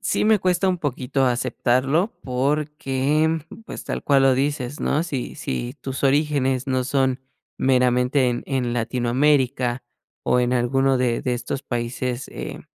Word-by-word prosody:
Sí - - 0
me 215 0 +5
cuesta 185 0 +1
un 180 -1 0
poquito 135 -2 -1
aceptarlo 130 - +1
porque, 150 +3 0 0.3
pues, - - -7
tal - - -4
cual 140 -2 +4
lo 135 - +5
dices, 140 0 -2
¿no?, 150 +3 +1
si 140 -7 -4
si 120 - -4
tus 135 +1 -4
orígenes 135 -2 +1
no 130 -1 +1
son 130 -1 +1 0.4
meramente 125 0 +3
en 120 - -4
en 125 -3 -1
Latinoamérica 125 +1 +1 0.4
o 125 - +2
en 125 0 +1
alguno 135 +2 +2
de 125 -2 +1
de 125 -1 0
estos 130 +3 -4
países, 120 +1 -3
eh, - - -7
130 Hz, 145 wpm, -23 LUFS, 125-145 Hz, 0.4 s, me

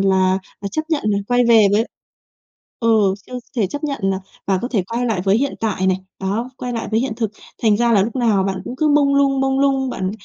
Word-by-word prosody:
là, 190 -1 +3 0.2
ờ, 200 - -4
chấp 310 - -1
nhận 315 -3 0
là 200 -1 +2
quay 245 0 +3
về 220 -3 +7
với 220 +2 +3 1.0
ừ, 220 -4 +3
chưa 250 - -10 0.2
thể 210 -4 +2
chấp 290 - -5
nhận 280 -2 -2
là 195 -1 +1 0.3
và 190 -2 +2
có 245 - -2
thể 215 -8 0
quay 245 +1 0
lại 220 -6 0
với 195 +2 +4
hiện 280 +2 -1
tại 195 -4 0
này. 185 -1 +3 0.2
Đó, 210 +6 -2
quay 250 -1 -4
lại 230 - -3
với 220 - +2
hiện 250 -2 -1
thực. 225 -4 -1 0.3
Thành 215 -2 +4
ra 235 +1 +2
là 200 -3 +5
lúc 225 +4 -3
nào 220 -6 +2
bạn 190 -1 -2
cũng 250 - -6
cứ 305 +3 +2
mông 285 -1 +3
lung, 275 -1 +3
mông 270 0 +1
lung. 270 -2 +2
Bạn, 185 -4 -2
225 Hz, 245 wpm, -19 LUFS, 195-265 Hz, 1.0 s, về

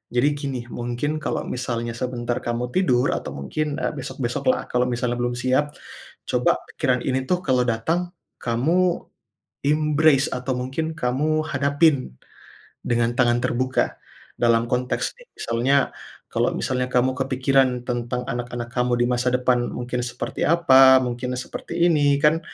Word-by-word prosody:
Jadi 130 +4 +4
gini 135 -3 -4
mungkin 120 +6 -2
kalau - - -2
misalnya 120 -2 -3
sebentar 120 -1 -2
kamu 120 +1 -3
tidur 130 -10 +2
atau - - -4
mungkin, 145 - -3
eee, - - -1
besok-besok 125 -3 -4
lah - - -2
kalau 125 0 +2
misalnya 120 0 -1
belum 120 0 -1
siap, 130 +4 0 0.5
coba - - +2 0.2
pikiran 125 -1 +1
ini 130 0 0
tuh 180 - +2
kalau 130 -2 +3
datang 165 +11 0 0.3
kamu 165 +10 +1 0.6
embrace 150 -1 +3
atau 125 +1 -2
mungkin 145 +6 -3
kamu 150 +5 0
hadapin 140 - +2 0.7
dengan 120 0 +1
tangan 120 -1 +3
terbuka. 130 +2 0 0.4
Dalam 115 -1 +3
konteks 125 0 -1
nih - - -17
misalnya, 120 +4 +1 0.6
kalau - - +1
misalnya 125 -1 -1
kamu 125 +1 +2
kepikiran 130 -1 +1
tentang 120 0 -2
anak-anak 120 0 -4
kamu 125 0 +1
di 120 - +4
masa 125 +1 +1
depan 125 -1 +2
mungkin 125 0 -4
seperti 120 - -5
apa, 135 -6 +7
mungkin 125 +1 -3
seperti 170 +6 -1
ini 145 -2 +3
kan, 155 +2 +4
125 Hz, 140 wpm, -23 LUFS, 120-145 Hz, 0.7 s, apa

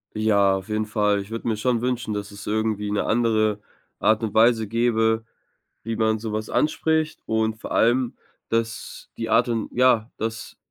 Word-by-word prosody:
Ja, 100 -3 +3
auf 95 +1 -9
jeden 110 0 0
Fall. 105 -1 +1
Ich 100 +3 -11
würde 115 +1 -4
mir 110 - 0
schon 120 +1 0
wünschen, 125 -3 -2
dass 105 0 -4
es 100 0 -10
irgendwie 105 -1 -1
'ne 105 - 0
andere 110 -2 +1 0.4
Art 110 +1 +3
und 110 -3 -3
Weise 110 -1 +4
gäbe, 115 0 +1 0.6
wie 115 +1 -3
man 110 0 +1
sowas 110 -1 -4
anspricht. 155 0 0
Und 110 0 -1
vor - - -7
allem, 120 +1 +2 0.3
dass 115 0 -3
die 115 -1 -4
Art 115 +3 +4
und 115 -2 -2
Ja, 120 -2 +3
dass 115 +1 -5
110 Hz, 175 wpm, -23 LUFS, 105-115 Hz, 0.6 s, Weise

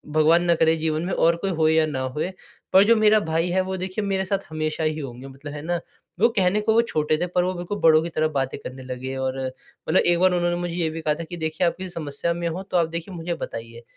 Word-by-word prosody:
भगवान 160 +3 +5
ना 170 -1 +3
करे 160 0 +3
जीवन 155 0 -1
में 185 - -2
और 170 +1 +3
कोई 195 +3 -2
हो 160 -2 +2
या 160 0 +4
ना 145 -4 -3
होए 140 +7 -2 0.4
पर 190 - +8
जो 230 +2 +5
मेरा 215 0 +5
भाई 165 -2 0
है 190 +1 +2
वो 190 0 -3
देखिए 185 +3 -3
मेरे 190 -1 0
साथ 195 +1 0
हमेशा 155 0 -2
ही 155 0 0
होंगे 130 -2 -7
मतलब 140 +2 -9
है 145 - -6
ना, 175 +2 -1 0.4
वो 230 +4 +5
कहने 190 +2 +3
को 220 +1 +2
वो 230 - +5
छोटे 155 -9 0
थे, 175 +3 -1
पर 180 0 +1
वो 185 +1 -1
बिल्कुल 180 +3 -5
बड़ों 155 -1 +6
की 170 - -3
तरह 155 0 +2
बातें 135 0 -2
करने 130 +1 -8
लगे 130 +1 -5
और 130 0 -2
मतलब 130 +7 -1
एक 175 0 +4
बार 185 0 +4
उन्होंने 175 0 +1
मुझे 175 -1 -3
ये 170 -2 0
भी 160 +1 -6
कहा 155 -1 +1
था 165 - -5
कि 175 - -6
देखिए 160 +2 0
आप - - 0
किसी 185 0 -6
समस्या 165 0 -3
में 170 0 -3
हो, 170 +3 -4
तो 190 -2 -1
आप 170 -2 +3
देखिए 170 +3 -5
मुझे 170 +1 -3
बताइए। 115 -5 -7
165 Hz, 270 wpm, -23 LUFS, 155-180 Hz, 0.4 s, पर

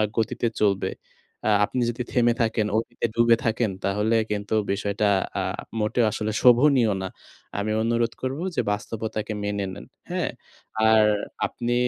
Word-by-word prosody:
আ - - +4
গতিতে 115 +1 0
চলবে। 100 -2 +2 0.6
আ - - +4
আপনি 125 - -2
যদি 120 +1 -4
থেমে 120 -1 +3
থাকেন, 110 -1 +1
অতীতে 120 +1 -2
ডুবে 115 0 +5
থাকেন, 110 -1 +1
তাহলে 105 +3 +1
কিন্তু 105 +1 -2 0.2
বিষয়টা 100 +1 0 0.3
আ - - 0 0.4
মোটেও 110 +3 +2
আসলে 110 0 -2
শোভনীয় 125 -2 +5
না। 95 - -3 0.5
আমি 105 +1 -1
অনুরোধ 115 0 +1
করবো 135 +5 -2
যে - - +3
বাস্তবতাকে 110 +1 -4
মেনে 100 -1 -1
নেন, - - -10 0.2
হ্যাঁ? - - -1 0.6
আর 110 -1 +6 0.4
আপনি 120 0 -2
110 Hz, 145 wpm, -25 LUFS, 105-120 Hz, 0.6 s, আর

